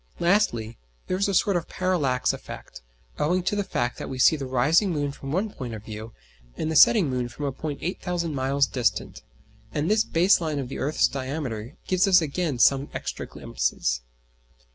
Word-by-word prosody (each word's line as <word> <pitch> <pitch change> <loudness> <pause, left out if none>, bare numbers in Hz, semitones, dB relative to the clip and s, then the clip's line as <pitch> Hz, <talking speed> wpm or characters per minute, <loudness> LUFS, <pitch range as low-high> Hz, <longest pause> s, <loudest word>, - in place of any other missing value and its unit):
Lastly, 145 - +1 0.3
there 185 - -1
is 200 - +1
a 200 - -1
sort 200 +2 +3
of 175 - -1
parallax 145 -9 +1
effect, - - -9 0.4
owing 180 +4 +1
to 190 - 0
the 205 - 0
fact 120 -10 -2
that - - -5
we 130 - -5
see 130 - +5
the 140 -3 -5
rising 150 - +3
moon 145 -4 -1
from 135 -1 -8
one 195 +6 0
point 120 - -6
of 105 - -9
view, 110 +1 -7 0.5
and 160 - -2
the - - -2
setting 190 +3 +7
moon 125 -2 -2
from 145 +5 -6
a 140 - -1
point 145 +2 -5
8,000 175 -2 -2
miles 135 +1 +2
distant; 120 -6 -1 0.5
and 150 +5 -1
this 215 0 +4
base 175 +3 +3
line 155 -3 -2
of 135 -3 -3
the - - -6
earth's 145 +3 +2
diameter 130 -3 -5
gives 185 +1 +2
us 185 -2 +7
again 160 -2 -2
some 135 +3 +4
extra - - -4
glimpses. - - -2
145 Hz, 190 wpm, -25 LUFS, 125-180 Hz, 0.5 s, setting